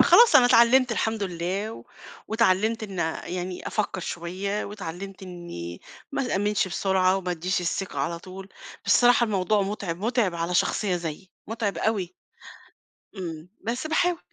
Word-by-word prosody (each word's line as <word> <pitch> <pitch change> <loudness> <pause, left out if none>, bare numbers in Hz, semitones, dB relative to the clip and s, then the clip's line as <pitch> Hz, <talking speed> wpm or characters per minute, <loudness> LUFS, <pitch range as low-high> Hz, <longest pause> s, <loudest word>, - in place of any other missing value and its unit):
فخلاص 475 -1 +8
أنا 245 - +7
اتعلّمت 245 +1 +5
الحمد 220 -1 -1
الله، 190 +4 -3 0.4
واتعلّمت 220 +1 +2
إن 195 -4 -4
أ 160 -1 -2
يعني 180 0 -4
أفكّر 210 -3 -2
شوية، 185 +5 -3
واتعلمت 195 -1 -7
إني 175 - -7 0.3
ما 275 - 0
تأمّنش 205 -2 +1
بسرعة، 190 0 +2
وما 185 -2 -3
أدِّيش 180 +2 -1
الثقة 175 -2 -3
على 170 +4 -2
طول، 190 +2 -10 0.4
بس - - +5
الصراحة 245 0 +5
الموضوع 205 -1 +1
مُتعب 195 -4 -3
مُتعب 220 -3 +1
على 170 +1 -2
شخصية 185 +1 +1
زيي، 170 +2 -6 0.2
مُتعب 210 -5 -2
أوي. 195 -4 0 1.1
إمم. 165 -2 -6
بس 245 +7 -3
باحاول. 340 +2 +1
195 Hz, 140 wpm, -26 LUFS, 175-220 Hz, 1.1 s, فخلاص